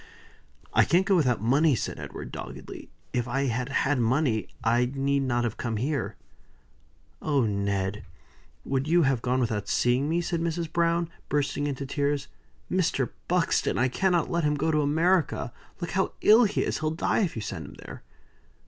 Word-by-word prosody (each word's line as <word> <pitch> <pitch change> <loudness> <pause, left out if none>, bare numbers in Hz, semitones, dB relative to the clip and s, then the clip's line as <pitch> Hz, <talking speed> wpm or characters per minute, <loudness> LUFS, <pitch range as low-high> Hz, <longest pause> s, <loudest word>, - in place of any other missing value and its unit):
"I - - +6
can't 180 +3 +3
go 200 -1 +3
without 125 - +2
money," 140 +5 +4
said - - -4
Edward, - - -7
doggedly. - - -8 0.2
"If 125 0 0
I 135 +3 0
had 125 0 -1
had 140 0 +1
money, 120 -1 +1 0.2
I 120 +2 +2
need 140 0 0
not 120 -2 0
have 115 -2 -2
come 115 -3 -2
here." 120 -5 -2 1.1
"Oh, 140 -5 +2
Ned! 100 -1 -1 0.6
would 135 +1 -1
you 170 +1 +4
have 135 -4 +1
gone 125 +1 0
without 110 -4 -1
seeing 125 +4 +2
me?" 165 +2 +1
said 170 -1 -2
Mrs. 165 -1 -2
Browne, 170 0 +2 0.2
bursting 145 0 0
into 140 -1 -3
tears. 140 0 -1 0.4
"Mr. 165 -8 +1 0.2
Buxton, 180 -1 +1
I 130 +1 +2
cannot 180 +5 +1
let 170 -1 0
him 150 0 +2
go 155 +3 0
to 150 -1 +2
America. 160 -3 +1 0.3
Look 175 - -4
how 190 +1 0
ill 225 +3 +7
he 205 - 0
is. - - -2
He'll 155 0 0
die 160 +2 0
if 190 -7 0
you 110 - -4
send - - -5
him - - -12
there." - - -10
140 Hz, 175 wpm, -27 LUFS, 120-165 Hz, 1.1 s, ill